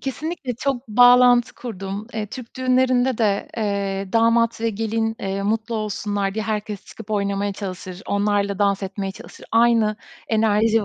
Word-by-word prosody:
Kesinlikle, 275 -1 -4
çok 255 -1 -3
bağlantı 245 +1 +6
kurdum. 200 -2 -6
Eee, 215 -1 -2
Türk 235 +3 -10
düğünlerinde 255 -1 +2
de, 205 -3 +1
eee, 200 -2 -2
damat 230 0 +3
ve 230 0 +1
gelin, 225 +1 -1
eee, 195 0 -2
mutlu 225 +3 -1
olsunlar 205 -2 -2
diye 220 -1 -2
herkes 210 -2 -3
çıkıp 220 -1 -12
oynamaya 200 -1 0
çalışır, 185 -2 -7
onlarla 200 -1 0
dans 200 -1 +1
etmeye 195 0 -4
çalışır. - - -13
Aynı 230 -2 +4 0.3
enerji 220 0 +2
215 Hz, 145 wpm, -22 LUFS, 200-230 Hz, 0.3 s, bağlantı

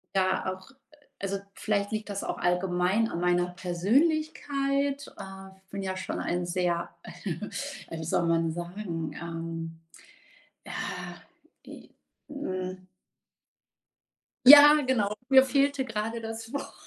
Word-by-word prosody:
ja 185 0 +1
auch 185 - -17 0.5
also 195 0 -2 0.2
vielleicht 200 -1 -1
liegt 215 -1 -3
das 200 -1 -3
auch - - -3
allgemein 180 +4 +1
an 170 - -4
meiner 175 0 +2
Persönlichkeit. 275 - 0
Äh, 190 0 -10
ich 190 - -30
bin 200 - -4
ja 190 -1 -3
schon 185 - -4
ein 175 0 -1
sehr, 175 -1 -1
äh, 180 - -6
wie - - -5
soll 165 +2 +1
man 165 -1 +2
sagen, 175 -1 -5
ähm, 165 -1 -6 0.9
ja, - - -7 0.9
e - - -12 0.4
hm 185 -9 -5 1.6
Ja, 290 +2 +11
genau, 215 -6 +1 0.2
mir 265 -1 +8
fehlte 275 +1 +1
gerade 225 0 -3
das 225 0 -7
Wort, 280 - -5
190 Hz, 120 wpm, -28 LUFS, 175-250 Hz, 1.6 s, Ja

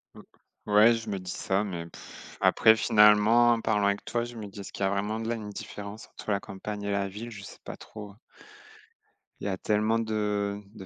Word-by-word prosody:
Mmh, - - -11 0.5
ouais, 105 +3 +6
je 115 -1 -6
me 100 -2 -2
dis 90 0 -7
ça. 95 +1 -1
Mais 85 -5 -5
pff, - - -13
après 110 0 +6
finalement, 105 +3 +5
en 115 -1 +1
parlant 105 -2 +1
avec 100 0 0
toi, 120 -1 -1
je 120 0 -8
me 110 -2 -7
dis: 100 +1 -11
«Est-ce 100 - -8
qu'il 100 - -4
y - - +3
a 95 - 0
vraiment 105 +2 -1
de 115 - -4
la 120 - 0
une 105 -2 -7
différence 105 +1 -8
entre - - -6
la 100 - +1
campagne 100 +1 -7
et 100 - -2
la 100 0 0
ville?» 110 +5 -8
Je 100 -3 -9
sais - - -11
pas - - -8
trop. 105 -2 -10 1.2
Il - - -7
y - - 0
a 95 - -2
tellement 110 +3 +1
de 105 -2 -1
de 100 -4 -10
105 Hz, 230 wpm, -28 LUFS, 100-110 Hz, 1.2 s, ouais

